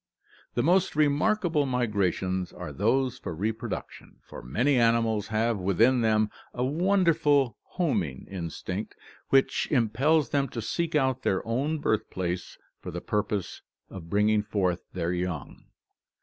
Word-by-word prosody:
The 120 - +1
most 180 +2 +3
remarkable 155 +1 +2
migrations 100 -7 0
are 75 - -7
those 120 - +1
for 85 - -5
reproduction, 110 +5 -5
for - - -10
many 120 - +1
animals 115 -2 +2
have 110 0 0
within 115 +7 +3
them 110 -1 +2 0.2
a 125 +1 0
wonderful 155 - +2
homing 105 - -2
instinct 85 -4 -5 0.3
which 135 0 +3
impels 135 +5 +2
them 140 -1 +1
to 115 - -5
seek 165 +8 -2
out 130 -3 +2
their 95 -6 0
own 140 +7 0
birthplace 95 - -2 0.2
for - - -6
the - - -4
purpose 105 -2 -2 0.3
of 85 -4 -9
bringing 105 +2 +3
forth 95 -4 -1
their 85 -1 -2
young. 90 -6 -4
115 Hz, 130 wpm, -27 LUFS, 95-140 Hz, 0.3 s, most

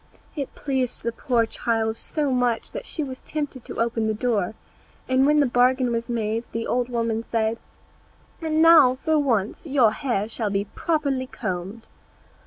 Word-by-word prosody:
It 280 -4 -5
pleased 265 -3 -2
the 235 - 0
poor 235 -1 +1
child 225 -1 -1
so 290 +4 -2
much 245 -2 0
that - - -6
she 315 - -2
was 260 -2 -6
tempted 290 -5 -5
to - - -7
open 230 -1 0
the 220 - 0
door; 220 -3 0 0.5
and 260 +1 +3
when 300 0 +4
the - - +4
bargain 250 0 +3
was 230 +1 -2
made 225 -1 -1
the 230 0 -2
old 245 0 0
woman 230 -2 -1
said, 225 0 0 0.8
"Now, 315 -4 +6
for 315 -1 +3
once 235 - 0
your 260 -6 +4
hair 230 -5 -1
shall 225 -1 -2
be 200 0 -1
properly 280 - -1
combed." 200 0 -5
245 Hz, 165 wpm, -24 LUFS, 225-275 Hz, 0.8 s, Now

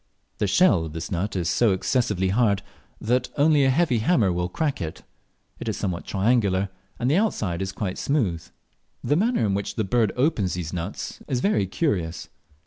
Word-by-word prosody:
The 105 - +1
shell 95 - +4
of 80 - -7
this 80 +4 -5
nut 95 +4 -2
is 90 -3 -1
so 110 +3 +3
excessively 95 -2 0
hard 100 -1 +2 0.4
that 125 +3 0
only 150 0 +4
a 135 - +4
heavy 130 -3 +2
hammer 110 - +2
will 90 0 -1
crack 145 - -2
it; 80 -1 -5 0.6
it 115 - -3
is 105 - -2
somewhat 90 -4 -3
triangular, 100 -2 +1 0.3
and 120 - -1
the 145 +6 +3
outside 105 - 0
is 95 0 -2
quite 95 -1 -4
smooth. 100 - 0 0.6
The 145 - +2
manner 220 - +2
in 100 - +1
which 100 0 -3
the 110 - 0
bird 110 +1 +2
opens 125 - +1
these 85 -2 -5
nuts 90 +3 -5
is 130 -4 0
very 130 - +1
curious. 90 - -2
105 Hz, 185 wpm, -24 LUFS, 95-130 Hz, 0.6 s, shell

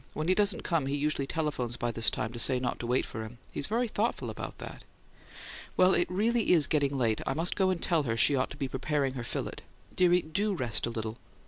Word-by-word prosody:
When 155 +1 -2
he 185 - +5
doesn't 205 0 +1
come 165 -6 0
he 140 - -1
usually 145 -1 -1
telephones 145 -7 -2
by 120 -1 -1
this 115 0 +2
time 110 - -3
to 120 - -5
say 130 +2 +6
not 125 -1 -2
to 120 - -4
wait 125 +2 +1
for 110 - -6
him; 110 +2 -10
he's 140 - +1
very 235 +3 0
thoughtful 220 +1 -2
about - - -7
that. - - -9 0.9
Well, 185 +1 +5
it 175 - +2
really 220 +3 +2
is 160 -4 +5
getting 140 -2 0
late: 115 -4 +1
I - - 0
must 165 +2 0
go 190 -1 +2
and 185 -2 0
tell 165 -2 +1
her 115 -5 -2
she 140 +5 +4
ought 130 0 0
to 140 - -9
be 140 -2 -2
preparing 135 +1 -1
her 125 -3 -5
fillet. - - -4 0.4
Dearie, 180 -1 +4
DO 200 +6 0
rest 120 -7 0
a - - -2
little." 110 0 -5
145 Hz, 240 wpm, -29 LUFS, 125-180 Hz, 0.9 s, say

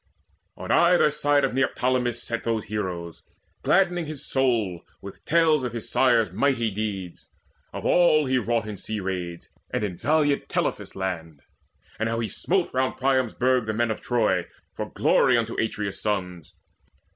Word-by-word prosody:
On - - -5
either 170 -3 +5
side 145 -1 +2
of 135 - 0
Neoptolemus 125 -2 0
sat 115 0 -4
Those 115 -2 -1
heroes, 90 -6 -4 0.4
gladdening 175 -3 +2
his 150 -2 -6
soul 115 -10 0 0.2
with - - -11
tales 160 -3 +3
Of 125 -2 -3
his 115 -2 -5
sire's 115 -7 +3
mighty 115 +1 +1
deeds 100 -4 -5 0.4
of - - -7
all 155 -4 +4
he 130 -1 +2
wrought 115 -2 -1
In 105 -2 -6
sea 110 +2 -4
raids, 90 -3 -4 0.2
and - - -2
in 95 -4 -3
valiant 150 -2 +1
Telephus' - - -2
land, 80 -6 -5 0.6
And 110 +1 0
how 115 0 -1
he 115 - -2
smote 185 -1 -1
round 130 0 0
Priam's 130 -3 +1
burg 125 -2 +2
the 110 - -1
men 120 0 +1
Of 110 - -4
Troy, 105 -7 +1 0.3
for - - -5
glory 125 -2 +3
unto 115 0 -1
Atreus' 105 -3 -3
sons. 90 -6 -3
115 Hz, 160 wpm, -25 LUFS, 100-135 Hz, 0.6 s, either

